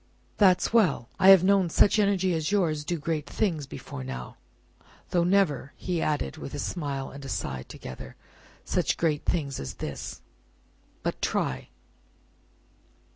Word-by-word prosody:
"That's 190 0 +4
well. 175 - +3
I 190 - +7
have 190 -2 +9
known 195 -2 +4
such 205 +6 +4
energy 195 -3 +2
as 160 +1 -1
yours 165 -7 +1
do 170 +3 -2
great 155 -1 -2
things 165 -10 -1
before 65 - -8
now 65 -1 -7 0.7
though 175 -1 +3
never," 175 -7 +1
he 175 -3 -2
added, 145 - -1
with - - -7
a - - -3
smile 140 -6 -3
and 140 0 -10
a 135 - -7
sigh 65 - -3
together, 65 - -9 0.5
"such - - 0
great 155 -3 0
things 140 -7 -1
as 65 - -6
this. - - -6 0.8
But - - -3
try! 65 -1 -1
160 Hz, 145 wpm, -27 LUFS, 140-185 Hz, 0.8 s, have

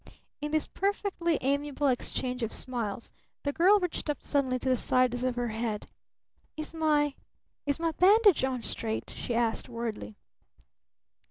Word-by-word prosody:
In 295 - -2
this 310 0 +1
perfectly 390 -5 0
amiable 285 +1 0
exchange 250 -1 -1
of 225 - -1
smiles 235 -4 -3 0.3
the 285 - -1
girl 385 +6 +5
reached 360 -4 -3
up 295 - -2
suddenly 265 -3 +1
to 255 - -5
the 255 - +4
sides 250 0 +2
of 255 -1 0
her 245 -1 -1
head. 220 -1 -3 0.7
"Is 310 +1 -5
my 300 -3 +2 0.5
is 285 +2 +1
my 330 0 +1
bandage 400 +1 +5
on 255 -3 -1
straight?" 220 -1 -3
she 240 - -4
asked 230 0 0
worriedly. 225 - -5
265 Hz, 150 wpm, -29 LUFS, 240-315 Hz, 0.7 s, girl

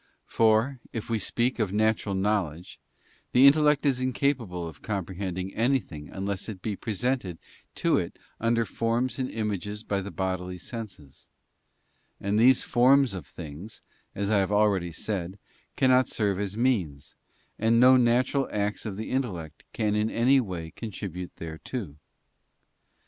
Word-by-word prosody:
For 115 +4 +2
if 115 0 -5
we 115 - +1
speak 120 +6 0
of 105 -4 0
natural 110 -1 +1
knowledge; 95 -4 -1 0.5
the 130 +2 +7
intellect 150 +1 +5
is 135 -3 +2
incapable 125 -9 -1
of 80 -3 -11
comprehending 95 -2 -4
anything 115 - -1
unless 100 +2 -4
it 100 -4 -6
be 105 -2 -2
presented 110 -3 -2 0.4
to - - +2
it - - -5 0.2
under 115 0 +2
forms 115 +4 -1
and 130 - -1
images 105 -1 -3
by 100 -3 -1
the 100 - -6
bodily 95 -1 -3
senses; 95 - -9 0.9
and 100 +2 0
these 125 +2 +5
forms 130 0 +4
of 90 -7 -7
things, 80 +8 -9 0.3
as 100 +1 -1
I 105 - +4
have 95 +1 0
already 100 -4 +2
said, 95 +1 -4 0.4
cannot 130 -1 +4
serve 100 -3 0
as 100 0 -3
means, 85 - 0 0.5
and 115 +1 +3
no 130 +1 +8
natural 130 +3 +2
acts 105 +1 -2
of 100 -2 -5
the 110 - -5
intellect 95 - -3
can 105 -2 0
in 105 +1 +1
any 130 +5 +4
way 90 -8 -4
contribute 95 -5 -6
thereto. 80 - -6
105 Hz, 145 wpm, -27 LUFS, 95-120 Hz, 0.9 s, no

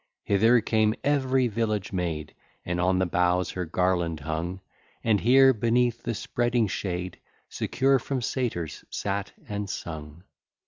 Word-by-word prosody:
Hither 115 +4 +4
came 110 0 +2
every 135 -3 +2
village 105 -3 -2
maid, 85 -4 -3 0.3
And 90 0 -1
on 90 +1 +2
the 95 - +2
boughs 90 0 +1
her 90 -1 -3
garland 85 -2 0
hung, 80 +5 -3 0.4
And 110 -3 +3
here, 130 +4 +6
beneath 120 +1 +1
the 115 -1 -3
spreading 120 +1 0
shade, 90 -2 -4 0.3
Secure 135 0 +1
from 135 +2 -3
satyrs 115 - -3
sat 100 0 -3 0.2
and 105 -2 -4
sung. 80 -1 -7
100 Hz, 135 wpm, -26 LUFS, 90-120 Hz, 0.4 s, here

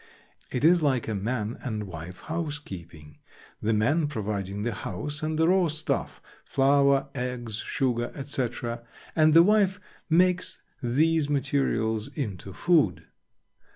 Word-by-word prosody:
It 125 - -3
is 170 +2 +6
like 135 -5 +1
a 110 - -1
man 105 +2 -2
and 110 -5 -3
wife 90 -1 -8
housekeeping, 95 - -6 0.4
the 110 - +1
man 145 +9 +2
providing 105 -6 -3
the 120 0 -1
house 145 +13 -4
and 155 0 -1
the 160 +1 +3
raw 185 0 +4
stuff—flour, 140 -2 +1
eggs, 125 -3 -3
sugar, 120 -1 -1
etc.—and 130 +3 -1
the 165 - +9
wife 200 -1 +3 0.3
makes 180 +2 +2 0.2
these 150 +5 +2
materials 130 -6 0
into 100 - -4
food. 150 - +2
130 Hz, 120 wpm, -27 LUFS, 110-155 Hz, 0.4 s, the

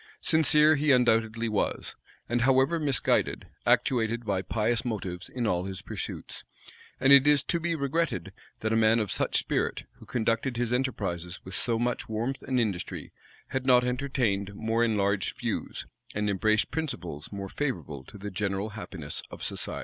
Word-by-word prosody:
Sincere 155 -1 +6
he 145 +1 +3
undoubtedly 115 -2 +3
was, 105 -2 -2 0.3
and, 120 +1 0
however 135 +6 +3
misguided, 145 -4 +1 0.2
actuated 115 -2 +2
by 100 -3 0
pious 110 +4 0
motives 95 -6 -4
in 125 -2 -3
all 90 -3 0
his 95 -1 -6
pursuits; - - -6 0.6
and 135 +1 +6
it 140 0 +8
is 145 -2 +5
to 170 - 0
be 170 0 -1
regretted 140 - -1 0.3
that 110 0 0
a - - +3
man 110 0 +4
of 105 -5 -1
such - - +1
spirit, - - -1
who - - -14
conducted 115 +2 0
his 120 0 0
enterprises 95 -9 -2
with 95 - -7
so 115 +2 +1
much 120 0 -2
warmth 115 +5 -2
and 130 -1 0
industry, 100 -7 -3 0.4
had 130 0 -3
not 125 -1 +6
entertained 125 -6 -1
more 115 +2 0
enlarged 100 -3 +1
views, - - -3 0.3
and 105 -1 0
embraced 110 +3 +2
principles 90 - -4
more 100 -1 -5
favorable 95 - -4
to 100 - -13
the 105 +1 -6
general 100 +2 -2
happiness 95 -8 -5
of - - -9
society. - - -1
115 Hz, 165 wpm, -28 LUFS, 100-130 Hz, 0.6 s, it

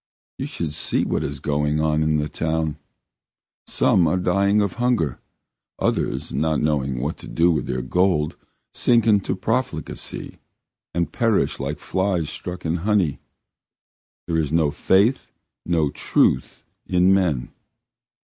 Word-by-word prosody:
You - - -2
should 80 -3 -4
see - - 0
what - - -1
is 70 0 -4
going 75 +2 0
on 75 0 +1
in 75 0 +2
the 75 0 -1
town! 80 -1 -2 0.9
Some 85 -3 +3
are 80 - +1
dying 100 +3 +2
of 100 -2 0
hunger, 110 - +1 0.6
others, 65 - -1
not 75 +2 +1
knowing 70 -4 0
what 75 +6 -2
to - - -10
do 85 +2 +3
with 80 - -1
their 65 0 -2
gold, 80 +1 +1 0.4
sink 115 -3 +3
into 105 -4 +2
profligacy 110 -2 -3 0.6
and 85 0 0
perish 115 -3 +1
like 70 +2 -3
flies 90 -2 -1
stuck 90 +1 -7
in 80 +2 0
honey. 95 -5 +1 1.1
There 80 -1 0
is 75 -3 -1
no 80 -2 +2
faith, 100 - +2 0.4
no 80 -5 +1
truth 65 - +1 0.2
in 90 +1 +4
men. 80 -10 0
80 Hz, 135 wpm, -22 LUFS, 75-95 Hz, 1.1 s, in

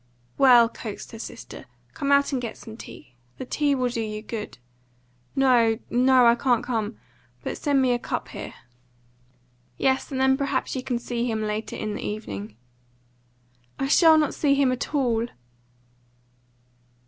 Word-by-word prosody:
"Well," 245 -3 +7
coaxed 225 -2 -8
her 225 - -9
sister, 235 - -9 0.3
"come 280 - -2
out 280 +1 +4
and 260 - 0
get 230 -2 -5
some 220 - -10
tea. 175 - -12 0.2
The - - -6
tea 290 +2 +1
will 250 -2 0
do 235 -1 -3
you 215 -1 -5
good." 220 - -6 0.8
"No, 240 -4 +4
no; 255 0 +5
I 235 - +7
can't 240 -1 +1
come. 225 -3 -2 0.5
But - - -3
send 280 -3 +1
me 255 - +3
a 240 - +1
cup - - -4
here." - - -8 1.2
"Yes, 265 +2 +1
and 265 - -2
then 265 0 +4
perhaps 275 -1 -1
you 260 - -2
can 255 -1 -2
see 240 0 -3
him 220 -1 -1
later 215 +1 -3
in 215 -1 -4
the - - -5
evening." 105 - -6 1.2
"I 270 - -1
shall 320 +2 +6
not 305 -2 +1
see 280 -2 +2
him 275 -2 +3
at 255 +4 -3
all." 235 -4 +1
245 Hz, 160 wpm, -25 LUFS, 225-270 Hz, 1.2 s, Well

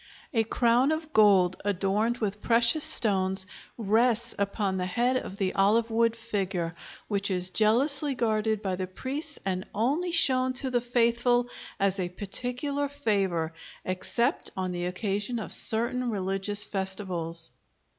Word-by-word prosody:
A 225 -2 +2
crown 240 +4 +2
of 315 0 -4
gold 195 -4 +4
adorned 205 +4 0
with 210 -2 -3
precious 235 +6 +3
stones 190 -10 +5 0.3
rests 235 +2 +2
upon 200 -1 -1
the 180 0 -2
head 240 +7 0
of 200 -6 -6
the 190 -2 -1
olive 220 +4 +2
wood 230 0 +2
figure, 195 -7 -3 0.3
which 200 -1 -1
is 180 -1 0
jealously 270 - +1
guarded 220 -2 -1
by 190 -2 -1
the 185 0 -4
priests 280 - -5
and 185 -1 -2
only 290 - 0
shown 260 -6 +4
to 260 0 -1
the 245 -1 +1
faithful 240 0 +1 0.3
as 195 0 +1
a 180 -1 -1
particular 250 +9 -3
favor, 195 - -1 0.3
except 235 - -1
on 185 -1 -2
the 175 0 -4
occasion 205 +5 -2
of 220 - -4
certain 240 +2 +1
religious 195 0 +1
festivals. 185 -5 -2
215 Hz, 140 wpm, -27 LUFS, 190-245 Hz, 0.3 s, stones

